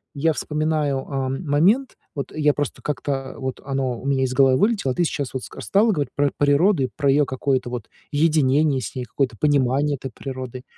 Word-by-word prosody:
я 160 +3 +2
вспоминаю, 150 -2 -1
а, 135 -2 -2
момент, 170 - +1 0.2
вот 140 -4 -5
я 150 -1 +3
просто 145 -2 -4
как-то 135 -1 -3
вот 130 -1 -4
оно 135 -3 -2
у - - -11
меня 135 -1 +1
из 130 - -1
головы 135 -1 +5
вылетело, 205 - +2
а - - -3
ты 175 - +2
сейчас 140 -4 -3
вот 130 - -4
ска - - -10
стала 215 +3 +3
говорить 145 -8 -2
про 145 0 +2
природу 145 +4 +3
и 130 - -1
про 140 -2 +1
её 145 +2 +4
какое-то 130 -1 -1
вот 120 -5 -6 0.2
единение 150 -2 +3
с 110 - -6
ней, 125 -1 -4
какое-то 125 0 -1
понимание 145 0 +2
этой 135 -1 -7
природы. 130 0 -7
140 Hz, 200 wpm, -22 LUFS, 130-150 Hz, 0.2 s, головы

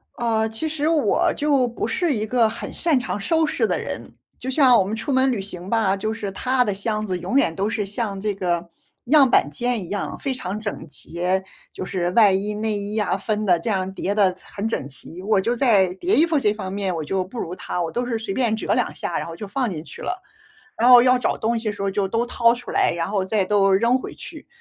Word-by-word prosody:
呃， 225 -2 0
其 225 +9 -3
实 305 0 -1
我， 320 -2 +2
就 285 -4 +2
不 235 - -3
是 350 -6 0
一 215 -2 -2
个 230 0 +2
很 230 - -7
擅 315 -6 +2
长 225 -4 -3
收 320 +9 +2
拾 - - 0
的 - - 0
人。 - - -7 0.2
就 260 - -5
像 260 -2 +5
我 - - +4
们 205 +4 -3
出 225 +6 -3
门 260 0 +3
旅 225 - -1
行 185 -1 -8
吧， 215 -4 +2
就 215 +3 -2
是 205 -3 -5
他 255 +5 +1
的 205 -4 -1
箱 215 +2 -2
子 185 -2 -2
永 265 - -1
远 165 -12 +2
都 200 +2 -1
是 215 -3 -2
像 200 -1 -3
这 210 0 -1
个， 175 -3 -2 0.4
样 275 0 +6
板 145 - +3
间 240 +2 -1
一 - - -12
样 205 - -3
非 270 -2 -2
常 210 -4 -4
整 205 -6 -5
洁， 180 +5 -2 0.3
就 185 - -6
是 175 -2 -1
外 210 -1 +6
衣、 200 +2 -1
内 215 -1 -1
衣 205 +2 -5
呀 210 -3 +1
分 210 +1 -2
的 175 -3 +3
这 225 - -4
样， 190 -2 -1
叠 200 +1 -2
得 190 -3 +3
很 205 +2 -4
整 140 -11 -2
齐。 165 +5 -7
我 205 0 +2
就 230 +5 0
在 200 -8 +3
叠 365 - +1
衣 320 - +5
服 325 -3 +1
这 210 -6 +2
方 190 -3 -6
面 195 -3 -2
我 160 - -3
就 185 +4 -1
不 215 +7 -11
如 175 -1 -4
他， 180 - -4
我 165 - -2
都 245 +1 -2
是 230 -2 -1
随 220 -3 -4
便 235 -3 +1
折 - - -1
两 - - 0
下， - - -3
然 - - -5
后 165 - -7
就 205 +3 -7
放 245 +3 -1
进 160 -5 -5
去 - - -11
了。 370 +1 -4 0.5
然 235 - +3
后 245 -1 +10
要 255 0 +4
找 - - 0
东 230 +2 0
西 225 - -5
的 210 - -3
时 200 - -8
候 200 - 0
就 195 0 0
都 230 +4 0
掏 235 -1 +3
出 245 - -8
来， - - +2
然 170 +2 -2
后 200 -2 0
再 195 0 +1
都 195 0 +3
扔 230 +6 +3
回 - - -8
去。 - - -11
215 Hz, 275 characters per minute, -22 LUFS, 190-245 Hz, 0.5 s, 后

